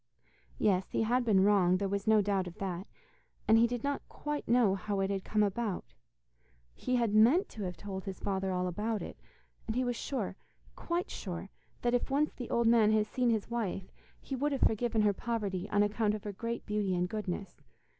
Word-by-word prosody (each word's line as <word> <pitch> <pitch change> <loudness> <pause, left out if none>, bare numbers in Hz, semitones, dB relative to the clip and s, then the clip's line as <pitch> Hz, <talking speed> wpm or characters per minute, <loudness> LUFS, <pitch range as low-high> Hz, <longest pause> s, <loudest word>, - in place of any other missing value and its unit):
Yes, 190 -2 +2
he - - 0
had 245 +3 +2
been 200 -5 +4
wrong, 190 -3 +4
there 200 +1 -1
was 200 +2 -2
no 215 -1 +5
doubt 195 -2 0
of 170 - -9
that, 190 0 -4 0.6
and 225 +1 +6
he 235 - +5
did 245 0 -4
not 285 0 -1
quite 295 0 -4
know 235 -4 +4
how 200 +1 -2
it 195 0 0
had 195 -1 -2
come 215 0 +2
about. 205 -1 -2 0.8
He 255 - -1
had 235 -4 +1
meant 250 - +5
to 215 - -7
have 180 -2 -5
told 195 -1 -6
his 190 -2 -5
father 190 -1 -1
all 180 0 0
about 210 +3 -2
it, - - -9 0.5
and 220 - -2
he 255 - +1
was 245 -1 -1
sure, 225 -7 -3 0.4
quite 345 +1 -2
sure, 185 0 -6 0.3
that 240 0 +2
if 245 - +1
once 290 +3 +1
the 245 - -7
old 235 0 +2
man 225 -2 +5
had 215 -1 +3
seen 245 +3 0
his 225 0 0
wife, 195 -5 -3 0.3
he 270 - -5
would 285 +3 0
have 270 - -2
forgiven 225 0 +2
her 205 -1 +4
poverty 205 -4 -3
on 205 0 +3
account 210 0 +1
of 210 - -7
her 205 -2 -5
great 230 +4 -4
beauty 210 -3 0
and 180 0 +1
goodness. 195 -2 -5
210 Hz, 210 wpm, -32 LUFS, 195-235 Hz, 0.8 s, and